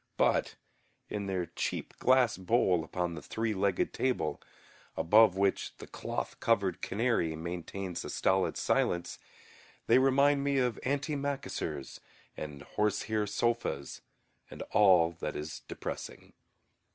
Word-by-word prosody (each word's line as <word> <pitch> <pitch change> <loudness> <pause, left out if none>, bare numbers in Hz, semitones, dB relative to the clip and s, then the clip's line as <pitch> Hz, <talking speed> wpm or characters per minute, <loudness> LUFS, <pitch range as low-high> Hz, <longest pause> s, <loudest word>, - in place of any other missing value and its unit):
But - - +2 0.6
in 100 -2 -3
their 95 -2 -1
cheap - - -4
glass 130 -3 +4
bowl 95 -3 +2
upon 90 +1 -2
the 80 - -7
three 110 +5 -2
legged 95 -1 0
table, 130 -1 -1 0.6
above 105 +1 +5
which 100 0 0
the - - -9
cloth - - -5
covered 100 -5 +1
canary 100 -7 0
maintains 90 +3 -5
a - - -6
stolid 95 0 +1
silence, 85 0 0 0.7
they 120 +3 +5
remind 140 +2 +4
me 140 -1 +1
of 125 -3 +1
antimacassars 140 - -3 0.4
and 75 -2 -7
horsehair 105 +3 0
sofas 105 - -1 0.5
and - - -7
all 90 -5 +6
that - - -3
is 75 +1 -5
depressing. - - -7
100 Hz, 120 wpm, -31 LUFS, 85-120 Hz, 0.7 s, all